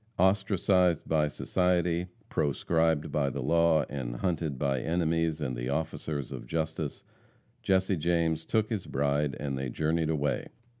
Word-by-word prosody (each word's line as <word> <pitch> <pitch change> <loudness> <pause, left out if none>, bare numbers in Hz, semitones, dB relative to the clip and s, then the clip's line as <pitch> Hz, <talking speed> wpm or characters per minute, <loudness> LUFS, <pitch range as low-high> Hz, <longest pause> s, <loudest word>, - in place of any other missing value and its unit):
Ostracised 95 -2 +3
by 75 -2 +2
society, 90 +2 0 0.2
proscribed 80 +2 +1
by 70 -2 +1
the - - -4
law, 85 -2 +3
and 65 -4 -4
hunted 80 -1 -1
by 70 -1 0
enemies 80 +1 0
and 65 -4 -2
the - - -3
officers 75 -1 -3
of - - -7
justice, 80 0 -3 0.6
Jesse 95 0 +2
James 80 0 +1
took 110 +5 0
his 105 -5 -2
bride, 70 +1 0
and 70 -2 -3
they 65 -1 -2
journeyed 80 +4 0
away. 75 -2 0
80 Hz, 140 wpm, -29 LUFS, 70-85 Hz, 0.6 s, Ostracised